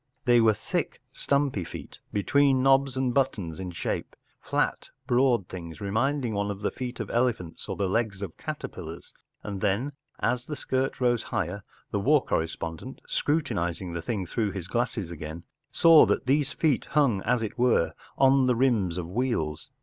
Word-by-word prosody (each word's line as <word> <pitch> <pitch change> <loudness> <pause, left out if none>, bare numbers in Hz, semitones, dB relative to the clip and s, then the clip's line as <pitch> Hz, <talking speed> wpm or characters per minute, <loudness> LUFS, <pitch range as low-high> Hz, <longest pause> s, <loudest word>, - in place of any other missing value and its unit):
They 120 -2 +6
were 110 -2 +4
thick, - - -3
stumpy 140 -8 0
feet, - - -9
between 135 +5 +3
knobs 135 -1 +4
and 130 -2 +1
buttons 100 - 0
in 95 -1 -4
shape—flat, 85 - -3 0.2
broad 120 -6 +3
tilings, 85 -3 -8
remind¬ 125 +8 0
ing 115 - -2
one 100 0 -1
of 100 -1 -5
the - - 0
feet 125 -1 -6
of - - -4
elephants 115 -9 -1
or - - -2
the 100 - 0
legs 100 -1 -1
of 90 -5 -6
caterpillars; 80 +2 -7 0.3
and 100 -2 -5
then, 105 +8 +1 0.3
as 125 0 0
the 150 - -3
skirt 130 -1 -1
rose 120 -2 +2
higher, 95 +1 -3 0.3
the 100 - 0
war 145 +7 +3
correspondent, 80 +8 -3
scrutinizing 95 - -1
the 85 - -3
thing 100 0 -2
through 105 +2 -1
his 90 -3 -5
glasses 105 -5 -2
again, 80 +1 -7 0.3
saw 165 -2 +7
that - - 0
these 140 +1 +2
feet 155 -5 +1
hung, 135 -10 +2
as 120 +2 +1
it 110 +3 -5
were, 120 -8 +3 0.2
on 135 -1 +5
the 125 - +3
rims 115 -9 +2
of 85 -2 -3
wheels. 100 - -2
115 Hz, 170 wpm, -27 LUFS, 90-130 Hz, 0.3 s, saw